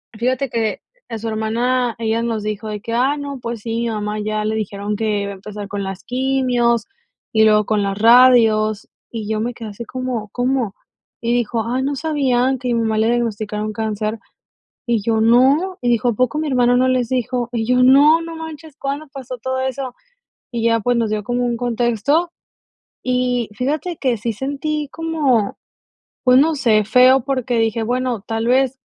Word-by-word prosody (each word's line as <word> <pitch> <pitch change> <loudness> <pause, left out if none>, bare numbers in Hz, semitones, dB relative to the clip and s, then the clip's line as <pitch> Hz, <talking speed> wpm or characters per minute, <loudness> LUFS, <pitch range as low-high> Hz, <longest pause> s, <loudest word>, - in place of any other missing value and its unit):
fíjate 255 +3 -1
que 225 -2 -1 0.3
a 230 - -4
su 225 - -5
hermana, 235 +3 0
ella 225 0 0
nos 225 -3 -2
dijo 215 0 -4
de 210 -1 -4
que: 230 0 -5
"Ah, 265 +5 +2
no, 280 -2 -6
pues 235 -2 -5
sí, 225 0 -3
mi 235 - -1
mamá 210 -1 -3
ya 215 0 -2
le 220 +1 -1
dijeron 205 0 -3
que 210 -1 -1
iba 200 - -4
a - - -7
empezar 205 +1 -8
con 200 0 -4
las 195 -1 -6
quimios, 250 -2 +1 0.5
y 220 0 +4
luego 210 -1 +4
con 210 -1 +1
las 195 0 -2
radios", 225 -2 +5 0.2
y 225 -3 -5
yo 220 - 0
me 235 +3 -2
quedé 225 -2 -8
así 220 +3 -8
como 255 -4 -4
como, 245 -3 -1 0.5
y 235 0 0
dijo: 235 -1 0
"Ay, 255 +2 -1
¿no 280 +1 -1
sabían 265 -4 +1
que 250 -1 -3
a - - +2
mi 230 - +1
mamá 220 -1 0
le 220 - +2
diagnosticaron 215 -2 -2
cáncer?", 215 0 -2 0.7
y 235 -3 +1
yo: 220 +1 +1
"No" 270 +11 +4
y 245 - -2
dijo: 240 0 +2
"¿A - - +1
poco 255 +6 0
mi 310 - -2
hermana 245 -1 +3
no 255 +1 +3
les 255 -2 +1
dijo?" 250 -1 -1
Y 225 -1 -1
yo: 250 +2 +3
"No, 290 +5 +6
no 330 0 -7
manches, 320 -2 -9
¿cuándo 280 +2 -4
pasó 255 -2 -7
todo 260 +2 -3
eso?". 265 -1 -3 0.6
Y 235 -2 -3
ya, 230 0 +3
pues, 245 +2 +1
nos 230 -2 0
dio 210 -1 -2
como 245 +1 -1
un 240 -1 0
contexto, 245 +7 0 0.7
y 250 -2 0
fíjate 305 +6 -2
que 250 -4 0
sí 230 +2 -3
sentí 285 +5 -3
como, 300 -10 0 0.7
pues, 255 0 +5
no 315 +2 +3
sé, 220 -6 +2
feo, 255 +3 +5
porque 255 -3 -1
dije: 225 0 0
"Bueno, 245 -1 -1
tal 225 +2 -3
vez" 260 +1 +2
240 Hz, 195 wpm, -19 LUFS, 220-260 Hz, 0.7 s, No